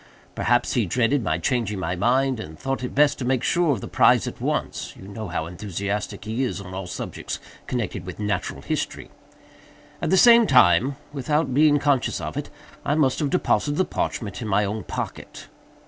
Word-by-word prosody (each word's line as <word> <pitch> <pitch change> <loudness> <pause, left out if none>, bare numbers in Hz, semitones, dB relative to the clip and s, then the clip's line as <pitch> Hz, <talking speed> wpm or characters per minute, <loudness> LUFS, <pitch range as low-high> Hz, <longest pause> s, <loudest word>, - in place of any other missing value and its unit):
Perhaps - - +1
he - - +1
dreaded 125 +2 +1
my 80 -3 0
changing 105 +2 -1
my 90 -1 -2
mind, 130 +6 +2
and 80 -7 -8
thought 135 -1 -3
it 125 - -5
best 145 0 +4
to - - -3
make 130 0 0
sure 170 -3 +2
of 120 -8 -1
the - - -6
prize - - +4
at - - -7
once—you 95 - -3
know 105 +1 -6
how 90 -3 -3
enthusiastic 100 +4 -4
he 110 +4 -2
is 125 - -2
on 95 -2 -9
all 95 -1 -5
subjects - - -5 0.3
connected 105 -6 -3
with 90 +2 -8
Natural 105 -1 -2
History. - - -3 0.9
At - - -1
the 190 - +4
same 235 +1 +7
time, 125 - +5 0.2
without 150 +1 0
being 145 +1 +5
conscious 140 -4 +1
of - - -5
it, - - -4 0.3
I 145 - +1
must 135 -4 +2
have 150 -3 0
deposited 150 -4 +1
the 185 - +3
parchment 105 0 -3
in 110 - -4
my 105 0 +2
own 105 +2 -4
pocket. - - -6
120 Hz, 190 wpm, -24 LUFS, 100-140 Hz, 0.9 s, same